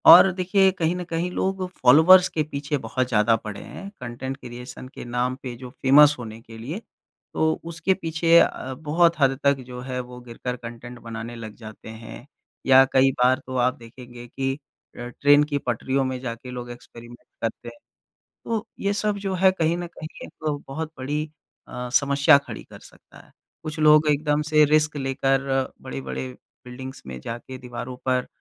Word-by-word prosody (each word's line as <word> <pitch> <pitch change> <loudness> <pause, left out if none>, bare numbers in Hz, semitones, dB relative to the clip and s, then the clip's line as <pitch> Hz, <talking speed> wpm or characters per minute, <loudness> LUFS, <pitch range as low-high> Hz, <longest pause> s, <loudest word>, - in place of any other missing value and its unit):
और 185 +2 +10
देखिए 190 +1 +3
कहीं 175 -2 -1
न 180 - -4
कहीं 170 +1 -2
लोग 190 0 -1
फ़ॉलोअर्स 165 +8 +7
के 155 - -1
पीछे 145 0 -3
बहुत 130 +3 -1
ज़्यादा 115 -1 +3
पड़े 105 -2 -7
हैं। 195 - -9
कंटेंट 125 +2 -5
क्रिएशन 125 0 -9
के - - -8
नाम 125 +1 -1
पे 125 -2 -5
जो 125 +1 -9
फेमस 145 +2 +7
होने 110 -2 -8
के 115 0 -13
लिए। 140 - -5 0.5
तो 160 0 +1
उसके 170 +3 0
पीछे 165 -2 +2
अ, 130 -4 0
बहुत 160 +4 +2
हद 135 -2 +3
तक 140 -1 +3
जो 125 -1 -8
है, 130 0 -4
वो 125 0 -8
गिरकर 125 +1 -5
कंटेंट 120 0 -9
बनाने 115 0 -7
लग 110 -2 -8
जाते 110 -1 -11
हैं 115 +2 -10 0.4
या 135 0 +8
कई 135 0 +5
बार 130 +1 +4
तो 130 - -5
आप 125 +1 +2
देखेंगे 120 +1 -12
कि 135 +2 -2 0.4
अ, 120 - -6
ट्रेन 145 +1 +6
की 145 -1 -1
पटरियों 130 +3 0
में 130 -1 -3
जाके 125 0 -6
लोग 120 -1 -6
एक्सपेरिमेंट 120 0 -13
करते 115 -1 -4
हैं। 295 - -16 0.7
तो 225 -1 -2
ये 200 +1 0
सब 205 0 0
जो 195 -1 -3
है, 190 +1 +5
कहीं 170 -2 0
न 175 0 -4
कहीं 160 -2 -10
एक 150 -2 -4
बहुत 155 +4 -5
बड़ी 145 +4 -2 0.4
अ, 125 0 -6
समस्या 140 +1 +5
खड़ी 140 - -8
कर - - -14
सकता - - -17
है। - - -24 0.3
कुछ 155 0 -5
लोग 155 0 +6
एकदम 150 0 +1
से 150 0 +4
रिस्क 150 +1 +2
लेकर, 135 0 +1 0.4
बड़े-बड़े 65 -1 -5 0.4
बिल्डिंग्स 130 +2 -8
में 65 -1 -7
जा 115 - -5
के 130 +2 -10
दीवारों 125 0 -7
पर 130 -1 +1
135 Hz, 180 wpm, -24 LUFS, 120-155 Hz, 0.7 s, और